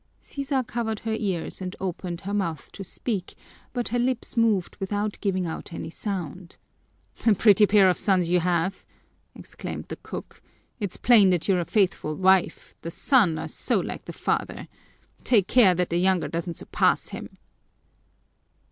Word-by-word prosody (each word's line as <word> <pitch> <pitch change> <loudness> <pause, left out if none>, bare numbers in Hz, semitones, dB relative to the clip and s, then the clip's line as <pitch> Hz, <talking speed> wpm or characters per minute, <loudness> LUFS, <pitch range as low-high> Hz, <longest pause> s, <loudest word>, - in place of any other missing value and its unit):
Sisa 275 -2 -2
covered 230 -2 -3
her 225 -1 -2
ears 195 -5 -3
and 185 0 -5
opened 180 -2 -4
her 200 +1 -5
mouth 170 -7 -2
to 195 - -8
speak, 195 0 -4 0.4
but 245 -1 -3
her 245 - 0
lips 250 0 -1
moved 220 -6 +2
without 205 +2 -2
giving 190 -3 0
out 165 +1 -6
any 165 - -6
sound. 180 -3 -5 0.7
"A 220 - +6
pretty 210 +1 +5
pair 200 -2 +6
of 180 - +2
sons 185 -4 +2
you 180 +1 +3
have!" 175 +2 0 0.5
exclaimed - - -7
the - - -5
cook. - - -9 0.4
"It's 200 -4 -4
plain 220 -5 +6
that 180 -3 +1
you're 190 -3 +3
a 175 - -1
faithful 180 -7 0
wife, 190 -2 +2
the 165 - -5
sons 190 - +3
are - - -4
so - - 0
like - - -5
the - - -6
father. - - -2 0.6
Take 215 -7 +3
care 210 -8 +5
that 180 0 -1
the 170 - +1
younger 180 -5 +2
doesn't 170 +1 -4
surpass - - +1
him." - - -9
190 Hz, 165 wpm, -25 LUFS, 175-215 Hz, 0.7 s, A